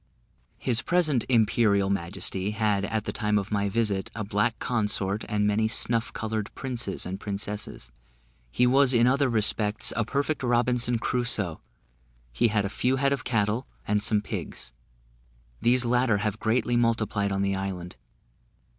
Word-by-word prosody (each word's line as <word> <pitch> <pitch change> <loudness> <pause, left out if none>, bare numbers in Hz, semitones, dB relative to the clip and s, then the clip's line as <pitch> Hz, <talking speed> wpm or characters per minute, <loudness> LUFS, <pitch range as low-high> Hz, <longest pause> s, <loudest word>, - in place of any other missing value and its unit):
His 125 -1 +3
present 155 -8 +1
Imperial 105 -4 +3
Majesty 95 +1 -1
had, 105 -3 +1
at 110 0 -2
the - - -2
time 105 -2 0
of 100 +1 -3
my 100 -1 0
visit, 100 -2 0
a 110 - -3
black 105 +2 0
consort, 105 -3 0
and 105 0 +1
many 105 +1 +2
snuff 115 +1 0
coloured 110 -2 -3
princes 120 -7 -3
and 95 +2 -5
princesses. 100 - -5 0.6
He 125 - +2
was 135 +1 +5
in 120 0 +5
other 135 +2 +3
respects 110 -1 +1
a 115 - +1
perfect 140 +6 -1
Robinson 120 -1 +1
Crusoe; 115 -8 -1 0.7
he 120 - +3
had 105 -2 0
a - - 0
few 125 +6 0
head 140 +1 +1
of 135 - -4
cattle, 110 +1 0 0.2
and 105 0 +1
some 105 -1 +2
pigs; - - -5 0.9
these 125 +1 +3
latter 120 -2 +2
have 105 +1 -2
greatly 120 +2 +1
multiplied 110 -4 +1
on 95 0 0
the 100 0 0
island. 95 -2 -5
110 Hz, 155 wpm, -26 LUFS, 100-120 Hz, 0.9 s, was